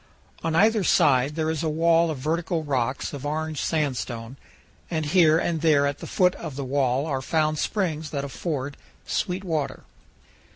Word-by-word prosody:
On 165 Hz, 0 st, 0 dB
either 215 Hz, +3 st, +4 dB
side 140 Hz, -3 st, +3 dB
there 160 Hz, -1 st, 0 dB
is 160 Hz, -, -2 dB
a 160 Hz, -, 0 dB
wall 165 Hz, +1 st, +3 dB
of 155 Hz, -, -3 dB
vertical 160 Hz, +4 st, -1 dB
rock 130 Hz, -3 st, -1 dB
of 140 Hz, -2 st, -6 dB
orange 155 Hz, +1 st, -2 dB
sandstone, 130 Hz, -6 st, -2 dB, 0.5 s
and 160 Hz, -3 st, -1 dB
here 160 Hz, 0 st, +5 dB
and 165 Hz, -1 st, -1 dB
there 150 Hz, -3 st, +4 dB
at 140 Hz, 0 st, -2 dB
the -, -, -7 dB
foot 180 Hz, -1 st, +3 dB
of 155 Hz, -5 st, -7 dB
the 140 Hz, 0 st, -4 dB
wall 135 Hz, 0 st, +1 dB
are 135 Hz, -4 st, -2 dB
found 155 Hz, +1 st, 0 dB
springs 160 Hz, -7 st, -1 dB
that 140 Hz, -2 st, -3 dB
afford 140 Hz, +1 st, -4 dB, 0.3 s
sweet 185 Hz, +1 st, -2 dB
water. 160 Hz, -6 st, -2 dB
155 Hz, 170 wpm, -25 LUFS, 140-165 Hz, 0.5 s, here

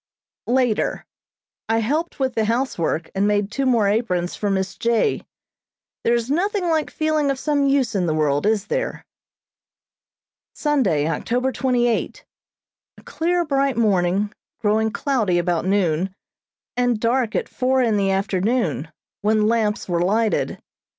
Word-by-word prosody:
Later. 245 Hz, -3 st, +1 dB, 0.6 s
I 225 Hz, -, +2 dB
helped 300 Hz, +10 st, -1 dB
with 260 Hz, -1 st, 0 dB
the 220 Hz, -1 st, 0 dB
housework 215 Hz, -9 st, -1 dB
and 195 Hz, +1 st, +1 dB
made 205 Hz, -1 st, +1 dB
two 270 Hz, +3 st, -1 dB
more 230 Hz, -5 st, +3 dB
aprons 185 Hz, -5 st, 0 dB
for 205 Hz, -, -2 dB
Miss 190 Hz, -1 st, -1 dB
J. 235 Hz, -, +1 dB, 0.8 s
There 235 Hz, -, +3 dB
is 235 Hz, +2 st, -2 dB
nothing 370 Hz, +3 st, 0 dB
like 315 Hz, -2 st, +1 dB
feeling 310 Hz, -2 st, 0 dB
of 275 Hz, -, 0 dB
some 285 Hz, 0 st, +1 dB
use 275 Hz, -4 st, +2 dB
in 185 Hz, -4 st, 0 dB
the 155 Hz, -, +1 dB
world, 150 Hz, +3 st, +1 dB
is 215 Hz, -2 st, +1 dB
there? -, -, -3 dB, 1.5 s
Sunday, 215 Hz, -, +1 dB
October 245 Hz, -, -1 dB
twenty 250 Hz, -2 st, +1 dB
eight: 235 Hz, -, -2 dB, 0.7 s
A -, -, -16 dB
clear, 345 Hz, +1 st, 0 dB
bright 275 Hz, -3 st, +1 dB
morning, 200 Hz, -2 st, +1 dB, 0.3 s
growing 220 Hz, 0 st, +2 dB
cloudy 220 Hz, -, 0 dB
about 175 Hz, -1 st, 0 dB
noon, 190 Hz, -1 st, +1 dB, 0.6 s
and 245 Hz, -2 st, +1 dB
dark 235 Hz, 0 st, 0 dB
at -, -, -1 dB
four 260 Hz, 0 st, +1 dB
in 225 Hz, -3 st, +2 dB
the 200 Hz, -1 st, +1 dB
afternoon, 195 Hz, +5 st, 0 dB, 0.3 s
when 215 Hz, 0 st, +2 dB
lamps 220 Hz, -1 st, 0 dB
were 170 Hz, -2 st, 0 dB
lighted. 215 Hz, +5 st, +1 dB
225 Hz, 145 wpm, -22 LUFS, 195-265 Hz, 1.5 s, more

